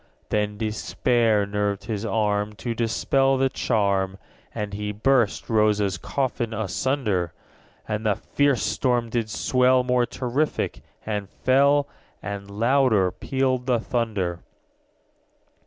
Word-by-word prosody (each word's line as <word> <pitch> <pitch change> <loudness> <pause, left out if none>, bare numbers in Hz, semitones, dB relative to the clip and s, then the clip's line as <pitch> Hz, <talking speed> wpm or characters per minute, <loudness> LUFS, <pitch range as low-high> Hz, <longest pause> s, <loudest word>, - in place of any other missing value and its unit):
_75 - - -34
14. - - -39
Then 105 0 0
despair 110 0 +1
nerved 100 0 -2
his 105 -3 -4
arm 105 -1 0
To 115 +2 -4
dispel 135 +4 +1
the 135 0 +2
charm, 100 -6 0 0.3
And 105 -1 -4
he 105 0 -3
burst 115 +1 +1
Rosa's 105 -3 +2
coffin 125 -4 -2
asunder. 105 - -1 0.5
And 105 0 -2
the 105 - +3
fierce 145 +1 +1
storm 115 +2 0
did 115 -2 -1
swell 125 +3 +3
More 125 -1 +2
terrific 125 - -2 0.2
and 105 -3 -3
fell, 140 +5 +3
_80 - - -29 0.4
And 100 -1 -5
louder 115 -3 +2
pealed 130 +1 -1
the 125 -2 +2
thunder. 105 -8 -2
110 Hz, 125 wpm, -24 LUFS, 105-125 Hz, 0.5 s, the